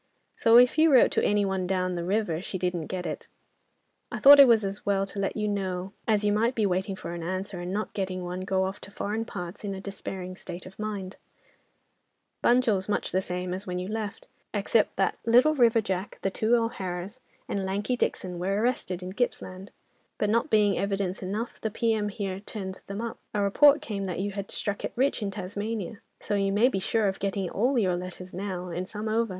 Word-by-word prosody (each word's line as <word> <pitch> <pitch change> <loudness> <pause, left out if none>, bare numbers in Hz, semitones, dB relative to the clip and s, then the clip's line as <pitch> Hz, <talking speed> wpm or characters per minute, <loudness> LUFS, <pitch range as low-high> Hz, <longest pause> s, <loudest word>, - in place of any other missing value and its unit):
"So, 230 +1 +6
if 250 +5 +6
you 320 0 +6
wrote 260 - +6
to - - +1
any 205 0 +3
one 190 -2 -1
down 185 -1 0
the 170 -1 -3
river, 185 -3 0
she 190 - -4
didn't 180 -3 -2
get 180 -1 -4
it. - - -5 0.8
"I - - -3
thought 285 +1 +9
it 275 -3 +10
as 205 -3 +2
well 195 -1 +1
to 195 +1 -7
let 195 +2 -1
you 210 0 0
know, 190 -2 -2
as 215 -2 +2
you 205 0 +3
might 230 +4 +2
be 220 - +2
waiting 190 +1 0
for 170 - -6
an 170 - -5
answer, 185 +2 -4
and 175 +1 -4
not 215 +3 -3
getting 185 -3 -3
one, 180 +1 -4
go 190 0 +1
off 190 +2 -4
to - - -9
foreign 210 +3 -3
parts 180 -1 -7
in 200 -1 -3
a - - -6
despairing 190 -2 -6
state 180 -1 -8
of 185 +2 -13
mind. 205 -3 -4 1.3
Bunjil's 225 -6 +3
much 210 - 0
the 185 - +2
same 180 0 -3
as 190 +2 -5
when 180 0 -2
you 180 +1 -3
left, 215 -1 -4 0.3
except 210 +2 +2
that 195 -1 0
Little 250 +7 +5
River 235 -5 +4
Jack, 190 -1 -3
the 195 - +1
two 220 +4 +2
O'Haras, 200 -2 -3 0.3
and 200 - -2
Lanky 200 +6 -1
Dixon 180 -6 -2
were 195 +3 0
arrested 210 -6 -1
in 185 +1 -6
Gippsland, 195 -4 -3 0.5
but 210 - +1
not 230 +1 +1
being 210 -3 +3
evidence 195 -1 -1
enough, 205 +5 -4
the 220 - -1
P.M. 220 -1 0
here 195 -2 -4
turned 195 -2 -7
them 200 +2 -4
up. 235 -1 -5 0.2
A 205 - +2
report 285 +9 +5
came 200 -7 -3
that 180 -3 -3
you 200 +1 -1
had 200 0 -5
struck 205 -1 -3
it - - -3
rich 265 0 +1
in 205 - -1
Tasmania, 205 +1 -4 0.2
so - - -4
you 195 -1 +1
may 215 +6 +4
be 195 - -1
sure 215 +2 +1
of 190 - -2
getting 195 -2 -2
all 250 +6 +1
your 185 -6 +2
letters 180 +1 -7
now 185 -1 -4
and 180 +2 -4
some 215 +1 -5
over. 225 +1 +1
200 Hz, 215 wpm, -27 LUFS, 185-220 Hz, 1.3 s, it